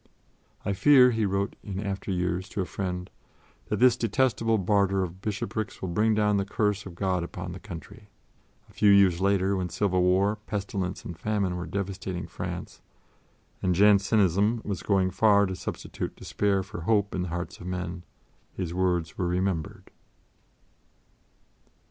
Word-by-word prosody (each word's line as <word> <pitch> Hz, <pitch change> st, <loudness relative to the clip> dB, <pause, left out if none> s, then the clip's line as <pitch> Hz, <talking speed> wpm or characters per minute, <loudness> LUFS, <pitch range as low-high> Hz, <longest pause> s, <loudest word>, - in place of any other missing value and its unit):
"I 100 Hz, -, 0 dB
fear," 125 Hz, +5 st, +6 dB
he 110 Hz, -3 st, 0 dB
wrote 100 Hz, +1 st, -1 dB
in 95 Hz, -2 st, -5 dB
after 100 Hz, -1 st, -4 dB
years 90 Hz, 0 st, -1 dB
to 100 Hz, -, -3 dB
a -, -, -1 dB
friend, 90 Hz, -1 st, -4 dB, 0.6 s
"that -, -, -1 dB
this 125 Hz, -1 st, +5 dB
detestable 115 Hz, -1 st, +1 dB
barter 95 Hz, 0 st, +2 dB
of 90 Hz, +1 st, -7 dB
bishoprics 110 Hz, 0 st, -3 dB
will 95 Hz, -, -4 dB
bring 105 Hz, +5 st, +2 dB
down 105 Hz, -1 st, +2 dB
the 100 Hz, -, +1 dB
curse 105 Hz, -1 st, -1 dB
of 90 Hz, -, -10 dB
God 95 Hz, -1 st, 0 dB
upon 90 Hz, +1 st, -6 dB
the 90 Hz, -, -7 dB
country." 100 Hz, +3 st, -10 dB, 0.6 s
A -, -, -21 dB
few 105 Hz, -, +3 dB
years 95 Hz, -3 st, +5 dB
later, 100 Hz, 0 st, +2 dB
when 90 Hz, -2 st, -2 dB
civil 95 Hz, +1 st, +1 dB
war, 95 Hz, +4 st, +3 dB
pestilence 100 Hz, -3 st, -3 dB
and 85 Hz, -2 st, -7 dB
famine 100 Hz, -4 st, -1 dB
were 90 Hz, -1 st, -5 dB
devastating 95 Hz, 0 st, -4 dB
France, -, -, -6 dB, 0.8 s
and 90 Hz, -1 st, +1 dB
Jansenism 105 Hz, +2 st, +3 dB
was 100 Hz, -3 st, -3 dB
going 95 Hz, -2 st, +1 dB
far 100 Hz, +1 st, +4 dB
to 95 Hz, -1 st, -3 dB
substitute 80 Hz, -, -5 dB
despair 100 Hz, -2 st, 0 dB
for 90 Hz, -2 st, -8 dB
hope 100 Hz, +2 st, +1 dB
in 95 Hz, -, -1 dB
the 90 Hz, -, -3 dB
hearts 85 Hz, +1 st, -5 dB
of 90 Hz, -, -8 dB
men, 90 Hz, -1 st, -4 dB, 0.5 s
his 90 Hz, -3 st, -3 dB
words 90 Hz, -3 st, 0 dB
were 90 Hz, -, +1 dB
remembered. 90 Hz, -2 st, -2 dB
95 Hz, 160 wpm, -27 LUFS, 90-105 Hz, 0.8 s, fear